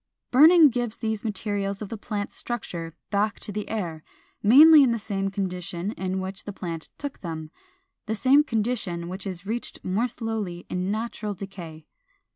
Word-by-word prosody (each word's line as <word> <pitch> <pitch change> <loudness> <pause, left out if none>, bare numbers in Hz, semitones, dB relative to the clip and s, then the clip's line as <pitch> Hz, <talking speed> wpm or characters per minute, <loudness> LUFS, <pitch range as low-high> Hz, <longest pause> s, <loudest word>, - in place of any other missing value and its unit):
Burning 310 +4 +8
gives 240 -2 -2
these 220 -2 -2
materials 200 -2 -2
of 210 - -6
the - - -4
plant's 205 -1 -4
structure 170 -9 -5 0.2
back 205 +1 +1
to - - -6
the 210 +1 -4
air, 170 -8 -3 0.4
mainly 295 +8 +9
in 260 -3 +4
the 230 - +1
same 200 -2 -2
condition 180 -1 -3
in 190 -3 -3
which 190 +1 -6
the 205 - -4
plant 170 -4 -6
took 285 -1 -5
them, 160 -3 -6 0.6
the 220 - -1
same 270 +6 +5
condition 215 - -1
which 190 +2 -5
is 185 0 -6
reached 230 +4 -4
more 205 +7 +1
slowly 220 -7 -4
in 180 +1 -1
natural 215 -1 -3
decay. 170 -5 -9
205 Hz, 165 wpm, -25 LUFS, 185-225 Hz, 0.6 s, mainly